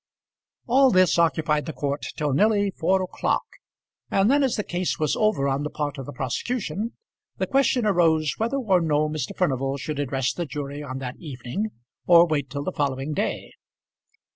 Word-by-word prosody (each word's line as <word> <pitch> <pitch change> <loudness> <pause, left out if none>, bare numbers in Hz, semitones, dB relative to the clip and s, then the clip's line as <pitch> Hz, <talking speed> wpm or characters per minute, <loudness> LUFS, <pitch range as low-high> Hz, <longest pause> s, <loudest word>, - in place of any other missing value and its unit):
All 265 +2 +5
this 185 -5 +4
occupied 155 -1 +1
the 160 - -4
court 140 0 -3
till 150 -3 0
nearly 205 +4 +3
four 185 +2 +1
o'clock, 185 - -1 0.7
and 195 +5 +3
then 285 +1 +4
as 265 -3 +1
the 210 - -1
case 180 -1 -2
was 155 -2 0
over 215 -11 +1
on 135 +1 0
the 150 - -3
part 145 -1 -4
of 135 - -7
the - - -5
prosecution, 195 - -3 0.4
the - - 0
question 270 -3 +2
arose 160 -7 +3
whether 235 +5 0
or 195 -9 +2
no 155 -2 +1
Mr. 150 -4 -4
Furnival 135 0 0
should 145 +2 -4
address 135 -2 -1
the 175 -2 -4
jury 145 0 -5
on 130 -3 -5
that 130 -2 -6
evening, 150 - -4 0.4
or 170 -1 +8
wait 145 -5 -1
till 140 +1 -4
the 185 - -2
following 140 -2 -2
day. 205 - -2
155 Hz, 180 wpm, -24 LUFS, 140-195 Hz, 0.7 s, or